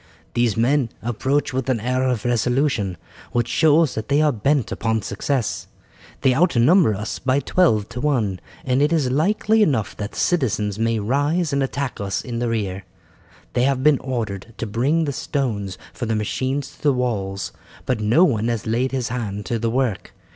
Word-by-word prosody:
"These 120 Hz, -3 st, +1 dB
men 125 Hz, +2 st, +2 dB
approach 130 Hz, +5 st, 0 dB
with 130 Hz, 0 st, -2 dB
an 125 Hz, -3 st, +1 dB
air 125 Hz, +3 st, 0 dB
of 120 Hz, -3 st, -2 dB
resolution 120 Hz, -, +1 dB, 0.4 s
which 120 Hz, -1 st, +1 dB
shows 155 Hz, +2 st, +3 dB
that 110 Hz, -, -4 dB
they 145 Hz, +1 st, +3 dB
are 155 Hz, -1 st, +4 dB
bent 135 Hz, +2 st, 0 dB
upon 110 Hz, -1 st, -1 dB
success. 135 Hz, -6 st, -2 dB, 0.5 s
They 130 Hz, -, +4 dB
outnumber 155 Hz, -, +4 dB
us 105 Hz, +3 st, -4 dB
by 130 Hz, +1 st, +1 dB
twelve 130 Hz, -, +2 dB
to 125 Hz, +2 st, -6 dB
one, 115 Hz, -11 st, 0 dB, 0.3 s
and 130 Hz, +1 st, +2 dB
it 150 Hz, +2 st, +3 dB
is 150 Hz, -6 st, +1 dB
likely 210 Hz, +9 st, +2 dB
enough 130 Hz, -, +1 dB
that 105 Hz, 0 st, -5 dB
the -, -, -10 dB
citizens 110 Hz, -, 0 dB
may 115 Hz, 0 st, +1 dB
rise 145 Hz, -, 0 dB
and 140 Hz, -, +1 dB
attack 135 Hz, -3 st, -3 dB
us 100 Hz, -1 st, -2 dB
in 120 Hz, -2 st, -4 dB
the 120 Hz, -1 st, 0 dB
rear. 100 Hz, -4 st, -2 dB, 0.7 s
They 125 Hz, -, +2 dB
have 135 Hz, -1 st, +1 dB
been 150 Hz, -2 st, +5 dB
ordered 115 Hz, -4 st, -4 dB
to 115 Hz, -, -3 dB
bring 135 Hz, +10 st, +1 dB
the 140 Hz, -, -2 dB
stones 110 Hz, -11 st, -2 dB, 0.2 s
for 120 Hz, -, -4 dB
the 110 Hz, -, 0 dB
machines 130 Hz, +6 st, -2 dB
to -, -, -22 dB
the 145 Hz, -2 st, +3 dB
walls, 100 Hz, -6 st, -2 dB, 0.3 s
but 125 Hz, -, 0 dB
no 110 Hz, +11 st, +4 dB
one 115 Hz, -, +2 dB
has 115 Hz, -3 st, -2 dB
laid 120 Hz, +4 st, 0 dB
his 130 Hz, -3 st, -1 dB
hand 105 Hz, -4 st, -4 dB
to 115 Hz, -, -2 dB
the 115 Hz, +1 st, 0 dB
work. 120 Hz, -4 st, -1 dB
125 Hz, 185 wpm, -22 LUFS, 110-140 Hz, 0.7 s, been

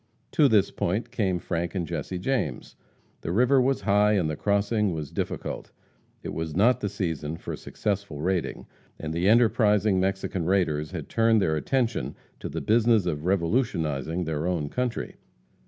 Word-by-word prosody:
To 150 Hz, -, +5 dB
this 105 Hz, -5 st, +3 dB
point 95 Hz, +7 st, -2 dB
came 95 Hz, -5 st, 0 dB
Frank 85 Hz, +1 st, -3 dB
and 90 Hz, -3 st, -1 dB
Jesse 85 Hz, +2 st, -4 dB
James. 90 Hz, -, -2 dB, 0.5 s
The 80 Hz, -, -3 dB
river 125 Hz, +7 st, +4 dB
was 135 Hz, +1 st, +1 dB
high 105 Hz, +1 st, +3 dB
and 95 Hz, -6 st, +2 dB
the 75 Hz, -, -2 dB
crossing 100 Hz, -1 st, +1 dB
difficult. -, -, -4 dB, 0.5 s
It -, -, -5 dB
was 80 Hz, -2 st, -4 dB
not 120 Hz, +6 st, +4 dB
the 105 Hz, -, -2 dB
season 80 Hz, -6 st, -3 dB
for -, -, -5 dB
successful 100 Hz, -7 st, -3 dB
raiding, 90 Hz, +2 st, -1 dB, 0.3 s
and 80 Hz, 0 st, -5 dB
the 85 Hz, +4 st, +2 dB
enterprising 110 Hz, -3 st, +4 dB
Mexican 95 Hz, -2 st, -1 dB
raiders 80 Hz, -5 st, +1 dB
had -, -, -6 dB
turned 115 Hz, -1 st, +3 dB
their 80 Hz, -5 st, +1 dB
attention 120 Hz, -, -1 dB, 0.2 s
to -, -, -5 dB
the -, -, -4 dB
business 115 Hz, -2 st, +3 dB
of 75 Hz, -3 st, -2 dB
revolutionizing 85 Hz, -, 0 dB
their 80 Hz, 0 st, -2 dB
own 80 Hz, -5 st, -1 dB
country. 125 Hz, +3 st, -3 dB
95 Hz, 155 wpm, -26 LUFS, 80-110 Hz, 0.5 s, To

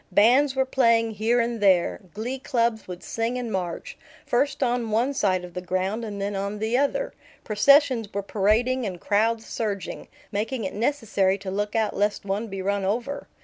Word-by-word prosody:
Bands 255 Hz, +8 st, +4 dB
were 265 Hz, 0 st, +2 dB
playing 230 Hz, -3 st, +3 dB
here 220 Hz, +3 st, +1 dB
and 235 Hz, -1 st, -1 dB
there; 185 Hz, -4 st, +3 dB, 0.2 s
glee 245 Hz, +5 st, -3 dB
clubs 235 Hz, -4 st, 0 dB
would 180 Hz, -1 st, -8 dB
sing 230 Hz, +2 st, -2 dB
and 240 Hz, -3 st, -4 dB
march, 190 Hz, -, -4 dB, 0.3 s
first 275 Hz, +3 st, +1 dB
on 240 Hz, -2 st, 0 dB
one 235 Hz, +6 st, +1 dB
side 185 Hz, -8 st, +1 dB
of 175 Hz, -, -12 dB
the 180 Hz, -, -4 dB
ground 185 Hz, +5 st, -2 dB
and 205 Hz, -2 st, -5 dB
then 200 Hz, +1 st, -2 dB
on 200 Hz, +2 st, -3 dB
the 220 Hz, +3 st, -1 dB
other; 285 Hz, -, 0 dB, 0.3 s
processions 245 Hz, 0 st, +4 dB
were 200 Hz, 0 st, -3 dB
parading 220 Hz, +6 st, +1 dB
and 185 Hz, -5 st, -4 dB
crowds 220 Hz, +3 st, +1 dB
surging, 200 Hz, -5 st, -4 dB, 0.2 s
making 225 Hz, +4 st, -2 dB
it 190 Hz, -, -3 dB
necessary 210 Hz, -6 st, +1 dB
to 195 Hz, -1 st, -6 dB
look 205 Hz, +2 st, -2 dB
out 220 Hz, -2 st, +1 dB
lest 205 Hz, 0 st, 0 dB
one 200 Hz, +3 st, -2 dB
be 195 Hz, -2 st, -5 dB
run 200 Hz, 0 st, 0 dB
over. 235 Hz, +8 st, -2 dB
220 Hz, 185 wpm, -25 LUFS, 200-245 Hz, 0.3 s, Bands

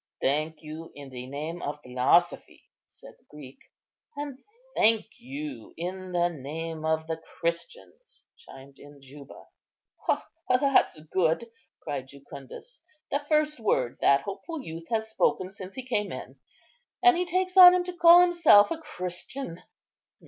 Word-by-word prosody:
"Thank 155 Hz, +3 st, -1 dB
you 155 Hz, +2 st, -9 dB
in 140 Hz, -1 st, -10 dB
the 125 Hz, -1 st, -8 dB
name 155 Hz, +5 st, -5 dB
of 150 Hz, +1 st, -4 dB
philosophy," 130 Hz, +8 st, +1 dB, 0.2 s
said -, -, -16 dB
the -, -, -35 dB
Greek. 145 Hz, -3 st, -12 dB, 0.6 s
"And 285 Hz, -2 st, -6 dB, 0.4 s
thank 225 Hz, +3 st, +2 dB
you 280 Hz, +4 st, -8 dB
in 185 Hz, +2 st, -5 dB
the 175 Hz, -1 st, +2 dB
name 160 Hz, +1 st, -6 dB
of 160 Hz, 0 st, 0 dB
the 160 Hz, 0 st, -3 dB, 0.2 s
Christians," 175 Hz, -, -5 dB
chimed 135 Hz, +1 st, -15 dB
in 145 Hz, 0 st, -15 dB
Juba. 140 Hz, +1 st, -14 dB, 1.0 s
"That's 255 Hz, -, +3 dB
good!" 165 Hz, +7 st, 0 dB, 0.3 s
cried 135 Hz, -2 st, -4 dB
Jucundus; 140 Hz, -, -12 dB, 0.3 s
"the 285 Hz, -, +1 dB
first 305 Hz, -2 st, +1 dB
word 130 Hz, -, 0 dB
that 140 Hz, -, +4 dB
hopeful 285 Hz, -, -7 dB
youth 165 Hz, +1 st, -8 dB
has 220 Hz, -1 st, -1 dB
spoken 190 Hz, -3 st, 0 dB
since 190 Hz, 0 st, -10 dB
he 260 Hz, -, -7 dB
came 210 Hz, -5 st, -1 dB
in, -, -, -8 dB, 0.7 s
and 365 Hz, -1 st, +7 dB
he 355 Hz, -, +1 dB
takes 370 Hz, +1 st, -1 dB
on 365 Hz, -1 st, +10 dB
him 360 Hz, -, +1 dB
to 360 Hz, 0 st, -6 dB
call 345 Hz, 0 st, +8 dB
himself 340 Hz, -11 st, +5 dB
a 330 Hz, -, -2 dB
Christian." 180 Hz, -, -7 dB
180 Hz, 140 wpm, -27 LUFS, -, 1.0 s, on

